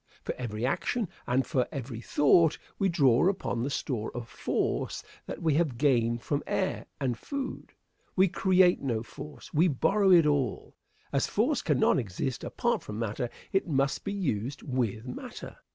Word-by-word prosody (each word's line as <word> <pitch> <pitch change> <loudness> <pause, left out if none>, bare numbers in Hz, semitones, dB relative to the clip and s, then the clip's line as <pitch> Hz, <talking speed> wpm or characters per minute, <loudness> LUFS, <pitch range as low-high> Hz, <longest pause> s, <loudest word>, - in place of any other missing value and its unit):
For - - -2
every 115 -2 -3
action 200 - -1 0.2
and 130 +2 +2
for 130 -6 0
every 125 -5 -5
thought, 150 +5 +4 0.2
we 195 -2 +3
draw 140 -2 +4
upon 185 -11 -2
the 130 - -1
store 125 -5 -2
of 120 -1 -5
force - - -2 0.2
that - - -6
we 160 -2 +3
have 150 -5 +1
gained 120 -4 +2
from 145 -1 -1
air - - -1
and 130 -3 0
food. 275 - -5 0.4
We 190 +1 +5
create 185 0 +4
no 115 -5 -1
force; 145 +5 -10
we 165 +4 +4
borrow 195 +7 +2
it 175 -4 +7
all. 145 -5 0 0.4
As 140 - +2
force 250 +6 +1
cannot 145 -3 +3
exist 115 +3 -3
apart - - 0
from 105 - -7
matter, 115 +2 -2 0.2
it 195 - +1
must 140 -3 +1
be 200 - -3
used 135 - -2
with 120 -4 -1
matter. 125 - -8
140 Hz, 165 wpm, -29 LUFS, 120-170 Hz, 0.4 s, it